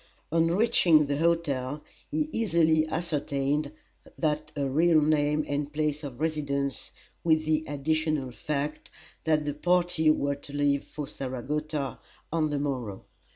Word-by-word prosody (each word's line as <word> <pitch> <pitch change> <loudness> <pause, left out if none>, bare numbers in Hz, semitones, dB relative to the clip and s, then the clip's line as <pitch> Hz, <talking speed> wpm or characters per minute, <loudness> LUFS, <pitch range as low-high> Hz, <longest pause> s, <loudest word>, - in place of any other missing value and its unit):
On 165 0 +3
reaching 175 -5 +4
the 140 0 -1
hotel 150 -4 0 0.3
he 305 +1 0
easily 160 - +3
ascertained 145 -3 -1 0.5
her 155 -2 +1 0.2
real 155 +4 +3
name 150 0 +2
and 145 0 -2
place 150 0 -1
of 135 -4 -7
residence, 140 -3 -1 0.3
with 155 -1 +3
the 155 0 +1
additional 155 -1 0
fact 145 +5 -3 0.4
that 155 -2 +2
the 145 - -1
party 175 0 +2
were 140 -2 +2
to 140 0 -10
leave 145 -1 +2
for 150 -2 -6
Saratoga 140 +2 -3 0.3
on 155 -2 +2
the 145 - -1
morrow. 125 -9 -3
150 Hz, 130 wpm, -28 LUFS, 140-160 Hz, 0.5 s, reaching